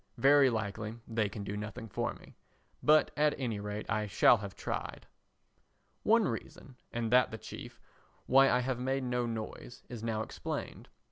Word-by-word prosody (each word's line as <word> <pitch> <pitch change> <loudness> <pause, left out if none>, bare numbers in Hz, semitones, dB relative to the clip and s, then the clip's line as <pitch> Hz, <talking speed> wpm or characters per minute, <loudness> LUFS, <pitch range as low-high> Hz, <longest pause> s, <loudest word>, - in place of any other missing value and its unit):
Very 140 0 +6
likely 110 -1 -3
they 110 -2 0
can 100 0 -6
do 100 +1 -4
nothing 105 +2 -6
for - - -2
me, - - -16 0.5
but 155 +1 +5
at 150 -1 +2
any 115 -6 -2
rate 105 +1 -5
I 110 -1 0
shall 105 +4 +5
have 100 -2 -7
tried. - - -5 1.0
One 225 -1 +4
reason, 125 +2 -6 0.2
and 115 -1 -2
that 125 -1 +5
the 110 - -6
chief, - - -9 0.5
why 135 +1 +6
I 125 - +3
have 125 -1 -2
made 135 +1 -1
no 125 -1 -1
noise, 115 +1 -6
is 120 -3 -7
now 110 -1 -1
explained. - - -6
115 Hz, 165 wpm, -32 LUFS, 110-130 Hz, 1.0 s, Very